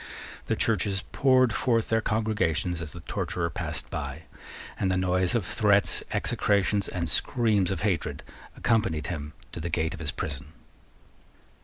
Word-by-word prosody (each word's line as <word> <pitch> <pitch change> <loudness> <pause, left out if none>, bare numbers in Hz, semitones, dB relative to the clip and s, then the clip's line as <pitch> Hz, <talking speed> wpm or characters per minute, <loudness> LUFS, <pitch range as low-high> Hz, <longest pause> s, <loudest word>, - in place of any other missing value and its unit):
The - - +1
churches 95 -2 +1
poured 130 -4 +4
forth 115 -3 +1
their 115 0 +2
congregations 95 -7 0
as 75 -2 -6
the 85 - -9
torturer 85 +1 -2
passed - - -4
by, - - -5 0.6
and 95 - +1
the 95 - +1
noise 90 0 +1
of 110 -6 +1
threats, 100 -1 +3
execrations, 100 0 +1
and 85 -2 -3
screams 105 +3 +3
of 95 - -2
hatred 95 -6 -1 0.3
accompanied 105 -10 +1
him 75 -2 -6 0.2
to - - -6
the 85 +2 -3
gate 80 +1 0
of 85 - -8
his 80 -3 -2
prison. 75 -2 -5
95 Hz, 150 wpm, -27 LUFS, 85-110 Hz, 0.6 s, poured